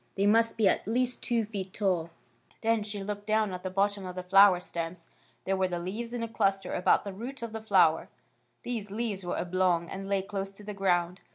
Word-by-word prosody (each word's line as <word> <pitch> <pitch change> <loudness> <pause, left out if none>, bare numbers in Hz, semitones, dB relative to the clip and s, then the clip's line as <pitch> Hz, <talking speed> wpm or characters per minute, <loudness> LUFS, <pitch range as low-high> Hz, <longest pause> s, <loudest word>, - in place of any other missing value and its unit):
They 200 - +1
must 225 +2 +3
be 215 -3 +4
at 190 - +1
least 250 +2 0
two 230 -2 0
feet 195 -3 -6
tall." 180 -6 0 0.5
Then 225 -1 +2
she 205 -1 -5
looked 205 +1 -5
down 215 -2 +2
at 180 - -5
the 185 - -3
bottom 200 +1 0
of 180 -1 -6
the 180 - -4
flower 195 0 +6
stems. 170 -1 -4 0.4
There 195 - +1
were 190 -1 +1
the 175 -1 -3
leaves 210 +7 -4
in 240 -1 -3
a - - -2
clus 195 -3 +1
ter - - -7
about 180 - +3
the 200 - -5
root 240 +6 -7
of 230 -1 -5
the 220 - -5
flower. 185 -7 +3 0.5
These 225 -4 -4
leaves 210 -2 -3
were 175 - -3
oblong, 175 -1 +1
and 195 0 -6
lay 195 -1 +1
close 195 0 -5
to 205 - -14
the 210 0 -6
ground. 180 -2 0
195 Hz, 225 wpm, -29 LUFS, 185-215 Hz, 0.5 s, flower